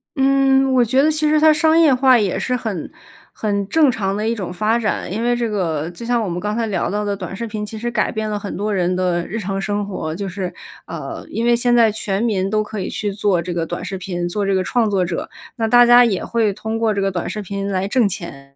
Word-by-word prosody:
嗯， 270 Hz, 0 st, +3 dB
我 250 Hz, -1 st, +5 dB
觉 260 Hz, +4 st, +2 dB
得 310 Hz, +2 st, +3 dB
其 305 Hz, 0 st, 0 dB
实 305 Hz, 0 st, +3 dB
它 310 Hz, 0 st, +6 dB
商 315 Hz, +2 st, +3 dB
业 315 Hz, -5 st, +5 dB
化 260 Hz, 0 st, +5 dB
也 195 Hz, -4 st, 0 dB
是 250 Hz, +6 st, -1 dB
很 220 Hz, -9 st, -4 dB, 0.4 s
很 200 Hz, -2 st, -2 dB
正 300 Hz, +2 st, +4 dB
常 195 Hz, -4 st, -2 dB
的 215 Hz, +1 st, -1 dB
一 230 Hz, -, +1 dB
种 195 Hz, -6 st, -5 dB
发 215 Hz, +5 st, +1 dB
展。 215 Hz, -5 st, -2 dB
因 220 Hz, +3 st, -2 dB
为 240 Hz, 0 st, +2 dB
这 240 Hz, -1 st, -1 dB
个 165 Hz, -7 st, -2 dB
就 175 Hz, +7 st, -9 dB
像 240 Hz, 0 st, +1 dB
我 -, -, -3 dB
们 175 Hz, +1 st, -3 dB
刚 210 Hz, +2 st, -2 dB
才 230 Hz, 0 st, 0 dB
聊 195 Hz, -5 st, -1 dB
到 210 Hz, +1 st, -2 dB
的 205 Hz, -1 st, -1 dB
短 190 Hz, -1 st, -7 dB
视 230 Hz, -, -4 dB
频， 215 Hz, -1 st, -5 dB
其 220 Hz, +1 st, -8 dB
实 240 Hz, +2 st, -3 dB
改 220 Hz, -3 st, 0 dB
变 220 Hz, 0 st, -3 dB
了 210 Hz, -1 st, -2 dB
很 205 Hz, -, -6 dB
多 210 Hz, +1 st, -1 dB
人 180 Hz, -1 st, 0 dB
的 180 Hz, -2 st, 0 dB
日 215 Hz, -, -4 dB
常 195 Hz, -1 st, -3 dB
生 205 Hz, +1 st, -2 dB
活。 160 Hz, -5 st, -4 dB
就 200 Hz, +2 st, -4 dB
是， 185 Hz, 0 st, -4 dB, 0.3 s
呃， -, -, -7 dB
因 230 Hz, -, -2 dB
为 240 Hz, 0 st, +4 dB
现 240 Hz, 0 st, +2 dB
在 230 Hz, -2 st, +5 dB
全 205 Hz, -1 st, -2 dB
民 195 Hz, -5 st, 0 dB
都 215 Hz, +1 st, +1 dB
可 210 Hz, 0 st, -6 dB
以 185 Hz, -, -3 dB
去 205 Hz, -1 st, -3 dB
做 200 Hz, -3 st, +1 dB
这 175 Hz, +1 st, -4 dB
个 170 Hz, -1 st, -1 dB
短 175 Hz, +1 st, -5 dB
视 195 Hz, 0 st, -4 dB
频， 175 Hz, -2 st, -3 dB
做 200 Hz, +4 st, -2 dB
这 195 Hz, 0 st, +1 dB
个 185 Hz, -, +1 dB
创 230 Hz, +2 st, +1 dB
作 190 Hz, -3 st, +1 dB
者。 170 Hz, -1 st, -4 dB, 0.3 s
那 225 Hz, -1 st, -1 dB
大 245 Hz, +2 st, +6 dB
家 240 Hz, +1 st, +7 dB
也 205 Hz, -6 st, -1 dB
会 225 Hz, -3 st, +1 dB
通 220 Hz, +3 st, -4 dB
过 225 Hz, -1 st, +1 dB
这 200 Hz, -, -1 dB
个 195 Hz, 0 st, 0 dB
短 175 Hz, -2 st, -3 dB
视 210 Hz, +3 st, -4 dB
频 200 Hz, +1 st, -4 dB
来 190 Hz, 0 st, -1 dB
挣 225 Hz, 0 st, +2 dB
钱， 140 Hz, -7 st, -8 dB
210 Hz, 290 characters per minute, -19 LUFS, 190-235 Hz, 0.4 s, 家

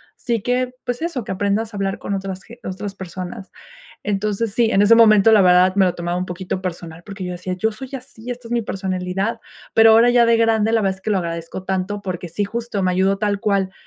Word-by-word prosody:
sí 235 Hz, -4 st, -2 dB
que, 250 Hz, +2 st, -1 dB
pues 245 Hz, +1 st, -3 dB
eso, 325 Hz, -7 st, -3 dB
que 190 Hz, -, -3 dB
aprendas 205 Hz, +3 st, -1 dB
a -, -, -6 dB
hablar 195 Hz, -1 st, -1 dB
con -, -, -4 dB
otras 195 Hz, -1 st, -4 dB
ge 235 Hz, +1 st, -14 dB
otras 195 Hz, +2 st, -5 dB
personas". 185 Hz, 0 st, -7 dB, 0.5 s
Entonces, 210 Hz, +1 st, -1 dB
sí, 230 Hz, 0 st, +2 dB
en 195 Hz, -, +3 dB
ese 210 Hz, +3 st, +6 dB
momento, 215 Hz, -2 st, +6 dB
la 210 Hz, -, +6 dB
verdad, 180 Hz, 0 st, +5 dB
me 200 Hz, -, +4 dB
lo 180 Hz, -, +1 dB
tomaba 175 Hz, 0 st, -3 dB
un 180 Hz, -, -2 dB
poquito 185 Hz, +1 st, -5 dB
personal, 170 Hz, -2 st, -6 dB
porque 195 Hz, -2 st, -7 dB
yo 180 Hz, -, -4 dB
decía: 180 Hz, +1 st, -6 dB
"Yo 220 Hz, +4 st, 0 dB
soy 260 Hz, +4 st, -9 dB
así, 250 Hz, -2 st, -9 dB
esta 245 Hz, -1 st, -8 dB
es -, -, -12 dB
mi 235 Hz, -, +1 dB
personalidad", 190 Hz, +1 st, -3 dB, 0.3 s
pero 225 Hz, 0 st, +7 dB
ahora 230 Hz, +2 st, +6 dB
ya 240 Hz, -1 st, +5 dB
de 230 Hz, 0 st, +4 dB
grande, 225 Hz, -1 st, +2 dB
la 230 Hz, -, +3 dB
verdad 195 Hz, -2 st, 0 dB
es -, -, -23 dB
que 215 Hz, -, -4 dB
lo 200 Hz, -, +2 dB
agradezco 170 Hz, +1 st, -5 dB
tanto, 190 Hz, +2 st, -2 dB
porque 180 Hz, -3 st, -5 dB
sí 205 Hz, +5 st, -2 dB
justo 230 Hz, -1 st, -4 dB
me 185 Hz, -, +2 dB
ayudó 190 Hz, +2 st, +2 dB
tal 205 Hz, -1 st, -1 dB
cual, 195 Hz, -2 st, +1 dB
200 Hz, 240 wpm, -20 LUFS, 185-225 Hz, 0.5 s, pero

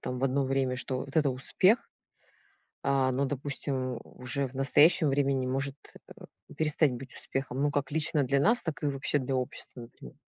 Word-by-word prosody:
там 125 Hz, 0 st, -4 dB
в 135 Hz, -, +1 dB
одно 135 Hz, +1 st, +1 dB
время, 130 Hz, -1 st, 0 dB
что 130 Hz, 0 st, -3 dB
вот 140 Hz, -, -7 dB
это 150 Hz, -3 st, +4 dB
успех, 185 Hz, -, +2 dB, 0.9 s
а, 135 Hz, -1 st, +2 dB
но, 135 Hz, +2 st, 0 dB
допустим, 135 Hz, -2 st, -3 dB
уже 130 Hz, +2 st, -4 dB
в 125 Hz, -, -15 dB
настоящем 145 Hz, +5 st, +4 dB
времени 135 Hz, -2 st, +1 dB
может, 135 Hz, +1 st, -2 dB, 0.4 s
э, -, -, -12 dB, 0.3 s
перестать 150 Hz, -1 st, +2 dB
быть 125 Hz, +1 st, -8 dB
успехом. 135 Hz, 0 st, -4 dB
Ну, 145 Hz, -, +2 dB
как 140 Hz, -1 st, -1 dB
лично 155 Hz, -1 st, +2 dB
для 140 Hz, +2 st, +1 dB
нас, 230 Hz, -, +3 dB
так 160 Hz, -2 st, -5 dB
и 145 Hz, -, +2 dB
вообще 135 Hz, +1 st, 0 dB
для 130 Hz, 0 st, -2 dB
общества 125 Hz, 0 st, -4 dB
например. 115 Hz, -, -12 dB
135 Hz, 180 wpm, -29 LUFS, 130-145 Hz, 0.9 s, это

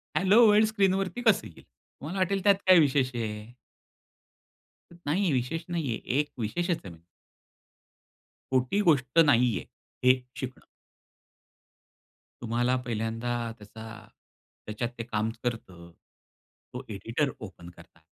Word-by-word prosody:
Hello 205 Hz, +5 st, +5 dB
world 210 Hz, +1 st, +5 dB
स्क्रीनवरती 195 Hz, +1 st, 0 dB
कसं 220 Hz, -5 st, +3 dB
येईल? 85 Hz, -, -16 dB
तुम्हाला 165 Hz, +8 st, -9 dB
वाटेल 190 Hz, +1 st, 0 dB
त्यात 200 Hz, -1 st, +6 dB
काय 185 Hz, -2 st, +8 dB
विशेष 135 Hz, -4 st, +2 dB
आहे? 105 Hz, -2 st, -4 dB, 1.5 s
नाही 170 Hz, +3 st, -2 dB
आहे. 170 Hz, -, +1 dB
विशेष 130 Hz, +6 st, -2 dB
नाही 165 Hz, -5 st, -2 dB
आहे. 115 Hz, -, -3 dB, 0.2 s
एक 150 Hz, 0 st, 0 dB
विशेषच 170 Hz, -, -1 dB
आहे -, -, -6 dB
म्ह 80 Hz, -, -17 dB, 1.5 s
खोटी 130 Hz, +9 st, +1 dB
गोष्ट 145 Hz, -6 st, +2 dB
नाहीये, 120 Hz, -, +2 dB, 0.4 s
हे 130 Hz, 0 st, +5 dB, 0.2 s
शिकणं. 130 Hz, -1 st, -6 dB, 1.8 s
तुम्हाला 120 Hz, +2 st, 0 dB
पहिल्यांदा 115 Hz, +1 st, -3 dB, 0.3 s
त्याचा 110 Hz, +1 st, -12 dB, 0.8 s
त्याच्यात 110 Hz, +3 st, -3 dB
ते 115 Hz, -, -4 dB
काम 110 Hz, -1 st, -2 dB
करतं. 95 Hz, -8 st, -5 dB, 0.8 s
तो 125 Hz, -, -6 dB
एडिटर 115 Hz, +7 st, -2 dB
ओपन 95 Hz, -5 st, -10 dB
करता 85 Hz, -1 st, -18 dB
130 Hz, 120 wpm, -28 LUFS, 115-175 Hz, 1.8 s, काय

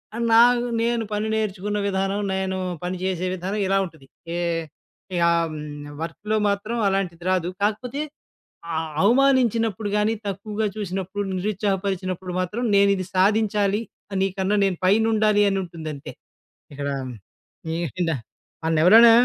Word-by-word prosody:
ఆ -, -, -4 dB, 0.2 s
నాకు 240 Hz, +1 st, +6 dB, 0.2 s
నేను 235 Hz, 0 st, +1 dB
పని 210 Hz, +1 st, -1 dB
నేర్చుకున్న 210 Hz, -1 st, -1 dB
విధానం 195 Hz, +1 st, 0 dB
నేను 190 Hz, 0 st, -1 dB, 0.3 s
పని 180 Hz, +1 st, -2 dB
చేసే 185 Hz, -1 st, -1 dB
విధానం 190 Hz, +4 st, -3 dB
ఇలా 195 Hz, +1 st, +3 dB
ఉంటది. 160 Hz, -6 st, -13 dB, 0.3 s
ఏహ్! 170 Hz, -1 st, -1 dB, 0.5 s
ఇకా 170 Hz, -1 st, +3 dB, 0.2 s
హ్మ్ 150 Hz, -1 st, -7 dB
వర్కులో 205 Hz, +6 st, -2 dB
మాత్రం 200 Hz, +4 st, -2 dB
అలాంటిది 185 Hz, -3 st, -1 dB
రాదు. 180 Hz, -2 st, +1 dB
కాకపోతే, 240 Hz, +7 st, -1 dB, 0.7 s
ఆ -, -, -3 dB, 0.3 s
అవమానించినప్పుడు 230 Hz, -3 st, +3 dB
గాని, 210 Hz, +2 st, +2 dB
తక్కువగా 210 Hz, +2 st, -2 dB
చూసినప్పుడు, 195 Hz, 0 st, -3 dB
నిరుత్సాహపరిచినప్పుడు 190 Hz, -2 st, -2 dB
మాత్రం 210 Hz, +7 st, -3 dB
నేను 200 Hz, 0 st, +5 dB
ఇది 185 Hz, -1 st, -4 dB
సాధించాలి 205 Hz, +1 st, +2 dB, 0.4 s
నీకన్నా 195 Hz, +1 st, 0 dB
నేను 190 Hz, -3 st, 0 dB
పైనుండాలి 215 Hz, +1 st, +4 dB
అని 195 Hz, -, 0 dB
ఉంటుందంతే. 155 Hz, -4 st, -7 dB, 0.6 s
ఇక్కడ 140 Hz, 0 st, -4 dB, 1.1 s
ఏడా 165 Hz, -4 st, +1 dB, 0.5 s
మన్నెవరైనా 180 Hz, +9 st, +7 dB
195 Hz, 120 wpm, -23 LUFS, 180-215 Hz, 1.1 s, మన్నెవరైనా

